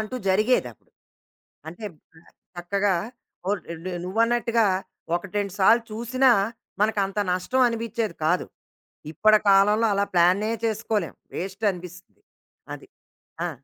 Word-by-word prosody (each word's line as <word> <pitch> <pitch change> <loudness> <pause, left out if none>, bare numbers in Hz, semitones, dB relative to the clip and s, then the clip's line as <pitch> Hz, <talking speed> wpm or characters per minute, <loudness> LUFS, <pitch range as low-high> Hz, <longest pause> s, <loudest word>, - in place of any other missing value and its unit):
అంటూ 215 +4 -4
జరిగేది 215 +6 +2
అప్పుడు. - - -30 0.8
అంటే, 175 +6 -9 0.7
చక్కగా 195 +3 0 0.5
ఓ - - +2 0.5
నువ్వన్నట్టుగా 230 +3 +2 0.5
ఒకటి 180 +2 -8
రెండు 200 -2 -3
సార్లు 225 +5 +5
చూసినా, 250 +4 +2 0.5
మనకంత 210 -2 +1
నష్టం 220 +9 +1
అనిపించేది 230 -4 -3
కాదు. 175 +3 +1 0.7
ఇప్పటి 215 +6 +4
కాలంలో 210 +3 +5
అలా 200 0 +1
ప్లానే 185 +5 +3
చేసుకోలేం. 215 -4 -1 0.2
వేస్టనిపిస్తది. 185 -2 -4 0.5
అది. - - -10 0.6
ఆ! - - -1
210 Hz, 100 wpm, -24 LUFS, 185-225 Hz, 0.8 s, సార్లు